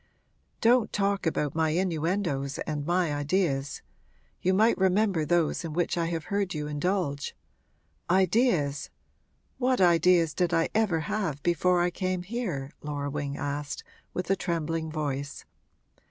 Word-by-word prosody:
'Don't 235 -1 +4
talk 200 -2 0
about 150 -3 0
my 160 0 +1
innuendoes 165 -4 -1
and 150 -1 -3
my 175 -3 +1
ideas 145 -2 -1 0.6
you 185 - +2
might 215 +5 +4
remember 190 -2 +2
those 170 +1 +1
in 165 -2 -5
which 175 +1 0
I 170 -1 0
have 165 -1 -2
heard 200 -4 0
you 150 -1 -3
indulge! 150 -1 -1 0.7
Ideas? 180 - +2 0.7
what 255 0 +2
ideas 170 -2 +4
did 180 -1 +1
I 165 - +2
ever 210 -7 +2
have 175 -7 -2
before 175 +1 +2
I 175 0 +1
came 185 0 -2
here?' 180 - -3
Laura 145 -1 -3
Wing 145 -1 -3
asked, 145 0 -4 0.3
with 180 +1 -3
a - - +4
trembling 165 -3 -2
voice. 145 -2 -4
170 Hz, 140 wpm, -28 LUFS, 150-190 Hz, 0.7 s, Don't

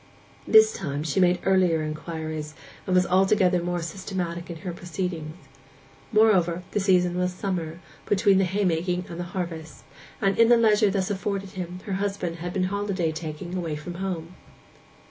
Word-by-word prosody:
This 440 0 +7
time 145 0 -3
she 160 +3 -1
made 180 -1 +4
earlier 180 -4 +3
inquiries, 155 0 -5 0.3
and 185 - +1
was 180 0 +4
altogether 185 -1 +3
more 175 0 -2
systematic 175 0 -4
in 170 - -5
her 180 - -3
proceedings. 170 -2 -4 0.8
Moreover, 185 -6 +3
the - - 0
season 180 -2 +2
was 180 0 +1
summer, 180 -4 -3 0.3
between 195 -1 +4
the 195 - +3
haymaking 180 -2 0
and 170 - -7
the 175 - -3
harvest, 165 -3 -5 0.4
and 195 0 +1
in 230 0 +6
the 240 - +7
leisure 215 -2 +4
thus 195 0 -1
afforded 195 -1 -3
him 180 -2 -6
her 200 - -3
husband 195 -3 -2
had 175 +1 -5
been 185 0 0
holiday 200 -5 -1
taking 160 +3 -6
away 165 -4 -2
from 155 +4 -7
home. 180 -3 -4
180 Hz, 165 wpm, -25 LUFS, 170-195 Hz, 0.8 s, This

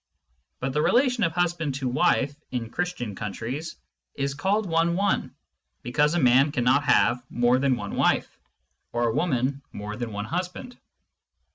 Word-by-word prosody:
But 130 0 -2
the 150 - +1
relation 250 - +3
of 165 -2 +1
husband 170 -5 0
to 135 -1 -2
wife 135 +2 +2
(in 115 -3 -4
Christian 175 - -3
countries) 115 - -5 0.4
is 140 0 -1
called 195 +9 0
one 165 0 +2
one, 200 +1 0 0.5
because 150 +6 +1
a - - +2
man 130 +2 +5
cannot 130 +2 +2
have 125 -2 +3
more 120 +1 +2
than 135 -1 +2
one 120 - -6
wife, - - +1 0.5
or 120 0 +1
a - - -2
woman 140 -3 0
more 105 +1 -6
than 120 -1 -5
one 105 0 -4
husband. 180 - -4
140 Hz, 155 wpm, -25 LUFS, 120-170 Hz, 0.5 s, man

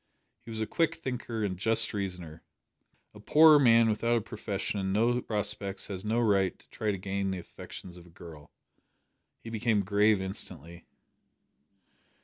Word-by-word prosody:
He - - -11
was 110 -1 -4
a - - +1
quick 165 +8 0
thinker 120 -3 -4
and 95 -3 -2
just 115 +3 +1
reasoner. 90 -6 -5 0.7
A 105 - -13
poor 150 +7 +7
man 115 -3 +5
without 115 +2 +1
a - - -1
profession 105 -2 -4
and 95 0 -2
no 120 +4 +2
prospects 105 -3 -3
has 95 -1 -5
no 110 +2 0
right 100 -5 +2
to - - -24
try 110 - -2
to 100 - 0
gain 95 +1 -2
the 95 - -2
affections 90 +1 -10
of 90 0 -14
a - - -17
girl. 80 -3 -13 0.9
He 115 - -8
became 110 -2 +1
grave 105 +1 +3
instantly. 85 -3 -7
105 Hz, 160 wpm, -29 LUFS, 95-115 Hz, 0.9 s, poor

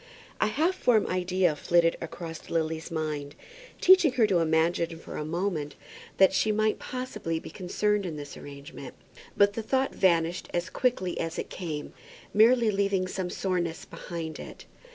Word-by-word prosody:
A - - +3
half 315 - +1
formed 240 - +3
idea 180 -2 +1
flitted 170 +2 +3
across 165 0 -7
Lily's 160 -1 -1
mind, 150 -3 -3 0.4
teaching 370 -7 +6
her 245 -4 +4
to 190 -4 +2
imagine 165 +1 +1
for - - -9
a - - -3
moment 160 -2 -2 0.4
that 190 0 +6
she 215 +3 +2
might 215 0 +1
possibly 235 -10 -4
be 160 - -8
concerned 205 +2 0
in 160 - -5
this 145 -1 -8
arrangement. 140 -1 -10 0.4
But 200 0 +5
the 225 - -3
thought 265 +4 0
vanished 170 -1 +1
as 175 +1 -2
quickly 235 -8 0
as 165 0 -3
it - - -5
came, 155 -5 -5 0.4
merely 230 +1 +5
leaving 195 -2 +1
some 185 -1 -3
soreness 175 -3 -2
behind 165 -2 -6
it. - - -10
180 Hz, 155 wpm, -28 LUFS, 160-210 Hz, 0.4 s, teaching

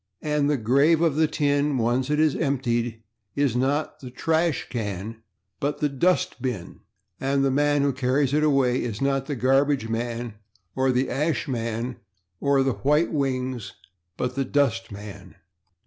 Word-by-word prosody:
And 150 -1 +1
the 145 - +2
grave 140 +8 +3
of 165 -4 +2
the 160 0 +3
tin, 145 -1 +1
once 125 +3 0
it 150 0 +1
is 155 -2 +3
emptied, 120 -4 -1 0.3
is 140 -4 +1
not 140 +5 0
the 130 - -8
/ash 160 +4 0
can/, 110 -1 -5 0.4
but 145 +1 -1
the 150 -1 0
/dust 180 +6 +1
bin/, 110 -8 -4 0.4
and 135 +1 +1
the 135 - +2
man 145 +1 +2
who 140 -1 +1
carries 130 +2 +1
it 150 - +3
away 135 -4 +2
is 115 -3 -4
not 135 -1 0
the 145 - -2
/garbage 135 -1 +2
man/ 115 0 -3 0.4
or 130 0 +2
the 125 +1 +1
/ash 150 +6 -1
man/ 115 -1 -3 0.4
or 140 -1 +3
the 135 -1 +1
/white 150 +7 +1
wings/, 130 -5 -2 0.4
but 125 - -2
the 135 +1 0
/dustman 115 -7 -2
135 Hz, 160 wpm, -25 LUFS, 120-145 Hz, 0.4 s, grave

